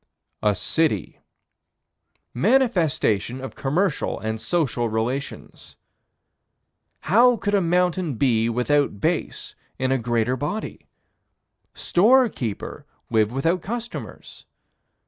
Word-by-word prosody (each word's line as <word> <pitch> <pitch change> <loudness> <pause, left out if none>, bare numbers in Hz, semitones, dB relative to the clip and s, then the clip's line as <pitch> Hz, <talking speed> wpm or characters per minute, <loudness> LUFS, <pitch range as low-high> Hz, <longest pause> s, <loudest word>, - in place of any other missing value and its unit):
A 105 -1 +2
city. 150 - -1 1.1
Manifestation 165 - +1
of 135 0 -7
commercial 150 +5 -1
and 110 0 -4
social 120 -3 0
relations. 120 +6 -4 1.3
How 235 +7 +4
could 205 -1 -2
a 200 - +4
mountain 180 -3 +1
be 115 -2 +2
without 125 -1 +1
base - - -2 0.2
in 130 0 -1
a 135 - +2
greater 120 +1 0
body? 150 - -5 0.9
Storekeeper 210 - +1 0.3
live 110 -1 +2
without 165 +8 0
customers? 235 +4 -7
140 Hz, 90 wpm, -23 LUFS, 115-180 Hz, 1.3 s, How